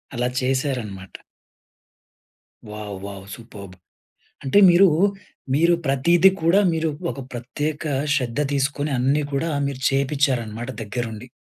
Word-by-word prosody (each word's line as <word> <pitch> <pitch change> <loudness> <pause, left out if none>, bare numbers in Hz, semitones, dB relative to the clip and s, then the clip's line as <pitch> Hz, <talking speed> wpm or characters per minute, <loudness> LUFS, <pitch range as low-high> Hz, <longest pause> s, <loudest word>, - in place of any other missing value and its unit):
అలా 125 +1 0
చేశారనమాట. 125 -7 -2 1.6
Wow! 105 -2 -7
Wow! 100 -1 -9
Superb! 100 -5 -11 0.7
అంటే 140 +9 +4
మీరూ 185 +3 +6 0.7
మీరు 170 +4 +4
ప్రతీది 170 +7 +4
కూడా 170 +5 +4
మీరు 160 0 0 0.2
ఒక 140 - -9
ప్రత్యేక 145 +6 -4 0.3
శ్రద్ధ 125 -2 -2
తీసుకొని 145 +1 -1
అన్నీ 135 +4 +2
కూడా 160 +4 0 0.2
మీరు 140 -2 -5
చేపిచ్చారనమాట 130 -4 -1
దగ్గరుండి. 115 +2 -5
130 Hz, 105 wpm, -22 LUFS, 115-150 Hz, 1.6 s, మీరూ